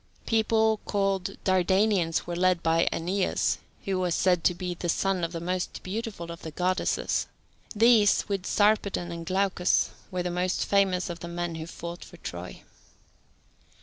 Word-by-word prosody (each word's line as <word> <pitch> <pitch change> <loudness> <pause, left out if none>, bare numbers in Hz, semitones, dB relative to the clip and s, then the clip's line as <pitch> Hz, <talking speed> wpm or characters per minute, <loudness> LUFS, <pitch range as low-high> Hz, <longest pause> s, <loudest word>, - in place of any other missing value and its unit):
People 220 -1 +2
called 195 -2 -1
Dardanians 190 -2 +2
were 175 - -4
led 180 -1 +2
by 165 +1 +3
Aeneas, 185 +3 0 0.3
who 190 -1 0
was 180 -2 0
said 180 -3 +2
to 180 - +4
be 180 0 -3
the 175 0 -4
son 190 +1 +1
of 165 - -1
the 170 - -4
most 180 +2 -3
beautiful 195 -4 -5
of 170 - -9
the 160 - -6
goddesses. 185 +4 0 0.5
These, 220 -1 +5
with 195 -2 -2
Sarpedon 205 -4 +2
and 170 -1 -7
Glaucus, 190 -1 +2 0.2
were 180 -2 -2
the 180 - -2
most 180 +1 0
famous 190 -3 +2
of 170 - -7
the 170 - -7
men 175 0 -3
who 160 0 -6
fought 170 +1 -7
for - - -13
Troy. - - -8
185 Hz, 160 wpm, -27 LUFS, 170-195 Hz, 0.5 s, These